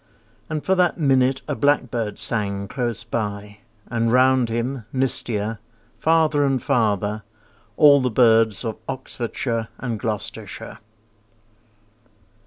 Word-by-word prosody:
And 155 -1 -4
for 190 - +3
that 180 -1 +2
minute 130 -3 +2
a 150 - -1
blackbird 125 -6 0
sang 100 -3 -1
Close 120 -2 -3
by, 105 -3 -4 0.3
and 115 -1 -1
round 130 -1 +4
him, 120 +2 -2
mistier, 115 -5 -1 0.4
Farther 160 -2 +2
and 135 -2 +1
farther, 105 -3 0 0.6
all 145 -2 +7
the 125 - +1
birds 115 -2 +3
Of 110 -2 -3
Oxfordshire 120 -3 -3
and 115 -4 -4
Gloucestershire. 105 -2 -5
120 Hz, 110 wpm, -22 LUFS, 110-135 Hz, 0.6 s, all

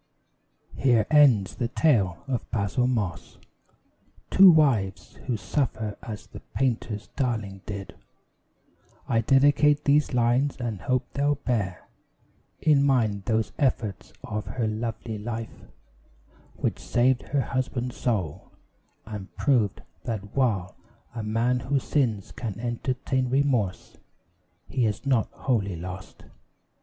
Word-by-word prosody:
Here 120 -5 +3
ends 130 -10 +5
the 120 - 0
tale 110 - +2
of 125 -4 -3
Basil 115 +4 0
Moss. 95 -8 -2 0.9
To 190 0 +9
wives 130 - +2
Who 120 -3 0
suffer 105 0 -2
as 110 -1 -7
the - - -11
Painter's 115 -5 -2
darling 110 -8 -2
did, 100 -2 -6 1.1
I 115 - +2
dedicate 145 +4 +4
these 145 0 +3
lines; 125 +4 +2
and 115 -7 -4
hope 130 -1 0
they'll 145 +1 +1
bear 105 -9 -2 0.7
In 145 -3 +4
mind 110 -8 +1
those 110 -2 0
efforts 115 -8 -1
of 105 -1 -4
her 120 -3 -1
lovely 110 0 -4
life, 115 +1 -6 0.9
Which - - -2
saved 125 +1 +2
her 140 0 +1
husband's 130 -1 -2
soul; 95 - -2 0.6
and 105 -2 -7
proved 105 -9 +1 0.2
that 105 -3 -5
while 105 -9 +1 0.4
A 115 - -4
man 115 +4 +1
who 130 +3 0
sins 120 -7 0
can 110 -4 -5
entertain 125 +2 -1
remorse, 125 -8 0 0.7
He 120 -4 +1
is 105 +5 -3
not 130 -5 +2
wholly 100 -8 -1
lost. 90 +3 -8
115 Hz, 120 wpm, -26 LUFS, 105-130 Hz, 1.1 s, To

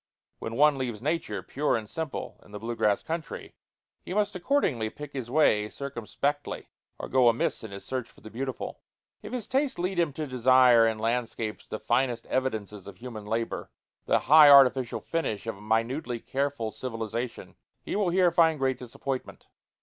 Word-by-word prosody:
When 115 - -5
one 145 0 +4
leaves 120 -5 -3
nature, 130 - -2
pure 145 -2 0
and 110 -2 -6
simple, 160 +4 -5
in - - -19
the - - -4
blue 115 +3 -4
grass 105 -2 +1
country, 165 -1 -5 0.5
he 185 - -6
must 205 -1 +1
accordingly 175 - +1
pick 145 +4 -10
his 130 -4 -5
way 110 -7 +3
circumspectly 140 +3 -3 0.3
or - - -6
go 125 -2 +5
amiss 115 0 0
in 110 - -6
his 100 0 -9
search 130 -3 -3
for - - -20
the 110 - -11
beautiful. 130 +1 -5 0.4
If - - -9
his 245 -4 -4
taste 270 +1 0
lead 180 +1 -1
him 165 -3 +2
to 155 +2 -4
desire 125 -2 +5
in 110 -1 -1
landscapes 115 -1 -2
the - - -4
finest 120 -1 0
evidences 110 -6 -3
of 100 - -10
human 115 -4 -8
labor, 115 +2 -3 0.4
the - - +4
high 150 +1 +7
artificial 130 -3 +6
finish 140 -12 -2
of 115 - -3
a - - -14
minutely 115 +4 -1
careful 135 -3 -2
civilization, 115 0 -5 0.3
he - - -4
will 200 -3 +2
here 180 0 +4
find 165 -2 +4
great 130 -2 0
disappointment. 130 +2 -5
130 Hz, 175 wpm, -28 LUFS, 115-150 Hz, 0.5 s, high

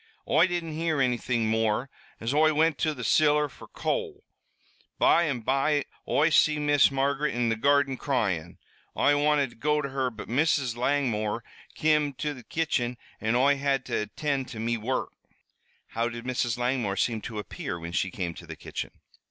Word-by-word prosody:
"Oi 160 +6 +4
didn't 175 -2 -3
hear 160 -2 0
anything 120 -3 +1
more, 110 +2 +1 0.3
as 115 +4 -2
Oi 155 +1 +4
wint 160 -1 +2
to 155 -1 0
the 125 - -6
ciller 150 +3 +3
fer - - -14
coal. 435 -4 -3 0.7
By 170 - +4
an' 135 -6 -2
by 140 +4 +1 0.2
Oi 155 +3 +3
see 150 +1 +4
Miss 145 -2 +4
Margaret 140 +1 0
in 120 -1 +1
the 115 - +1
garden 140 +2 +2
cryin'. 100 - -1 0.4
Oi 145 - +4
wanted 145 -4 +2
to - - -17
go 150 +5 +1
to 140 -2 -3
her, 135 -1 -1
but 110 -3 -9
Mrs. 135 -1 +1
Langmore 120 -4 0 0.3
kim 150 -2 +2
to 150 +3 -3
the 130 - -11
kitchen 125 -5 -1 0.2
an' 110 +2 0
Oi 140 +3 +4
had 135 -2 0
to 120 - -3
attind 135 +3 -2
to 115 - -8
me 115 +1 0
wurruk." 115 +4 -2 0.8
"How 115 +1 -1
did 120 0 -8
Mrs. 120 -2 -1
Langmore 120 -5 -1
seem 110 +2 0
to 110 - -7
appear 100 -3 -5
when 85 0 -7
she 95 +1 0
came 90 -2 -4
to - - -12
the - - -7
kitchen?" - - -6
135 Hz, 180 wpm, -27 LUFS, 115-150 Hz, 0.8 s, Oi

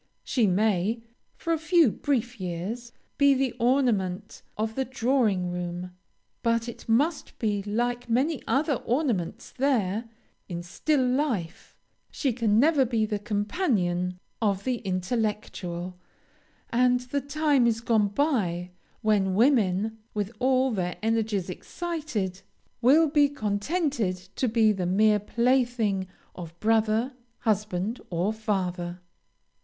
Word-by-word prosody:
She 235 -5 +2
may, 210 +3 +1 0.3
for 335 - -1
a 325 - 0
few 325 - +4
brief 245 -3 -1
years, 190 +7 -4 0.3
be 280 -1 +6
the 265 -1 0
ornament 225 -7 +1 0.2
of 220 +1 -1
the 265 - 0
drawing 235 -8 +1
room; 175 0 -4 0.5
but 230 0 +1
it 235 - -9
must 290 +8 +1
be, 205 -3 0
like 240 +4 -2
many 270 +6 +1
other 290 +2 +2
ornaments 235 - -1
there, 230 -5 0 0.4
in 175 -1 -4
still 260 - 0
life; 250 - -2 0.3
she 270 -5 -1
can 220 -2 +2
never 295 +1 +5
be 230 -3 +1
the 210 -1 -2
companion 205 - 0 0.2
of 200 -3 +1
the 255 -2 0
intellectual; 185 -3 -3 0.7
and 250 +1 +3
the 255 +3 -2
time 285 -2 +2
is 225 -1 +1
gone 225 -3 +2
by, 200 - 0 0.3
when 200 -3 +2
women, 220 -3 +2 0.2
with 205 0 -1
all 260 0 +3
their 180 -4 -2
energies 220 -4 0
excited, 225 - -4 0.4
will 295 +7 +6
be 290 -1 +4
contented 250 - -1 0.2
to 255 - 0
be 220 -1 +4
the 185 -4 -1
mere 210 +3 +4
plaything 235 -3 +1 0.3
of 170 -1 -9
brother, 225 +3 +2 0.3
husband, 210 0 -1
or 180 +5 0
father. 180 -5 -2
225 Hz, 125 wpm, -27 LUFS, 195-255 Hz, 0.7 s, be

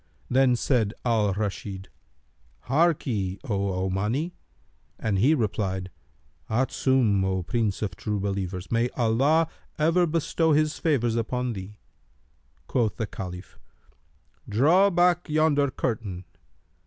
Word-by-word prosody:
Then 130 -1 +4
said 115 -4 +1
Al 110 -4 +2
Rashid, 100 -2 -4 0.8
"Harkye, 130 - +1
O 100 -6 -1
Omani!" 110 - -1 0.7
and 100 -3 -1
he 140 +10 +4
replied, 95 -6 -2 0.6
"Adsum, 120 -3 +2
O 95 -1 -1
Prince 110 0 -1
of 95 -4 -3
True 105 +2 -3
Believers! 95 -2 -3
May 120 +1 +2
Allah 135 +8 +3 0.3
ever 165 +3 +3
bestow 165 0 +1
his 155 +1 +1
favours 120 -8 +1
upon 125 +2 -1
thee!" 100 +1 -8 0.9
Quoth 115 -6 0
the 110 - -1
Caliph, 90 -3 -8 0.9
"Draw 160 - +4
back 175 -1 +2
yonder 150 -2 +3
curtain." 105 -8 -3
115 Hz, 110 wpm, -26 LUFS, 100-145 Hz, 0.9 s, Then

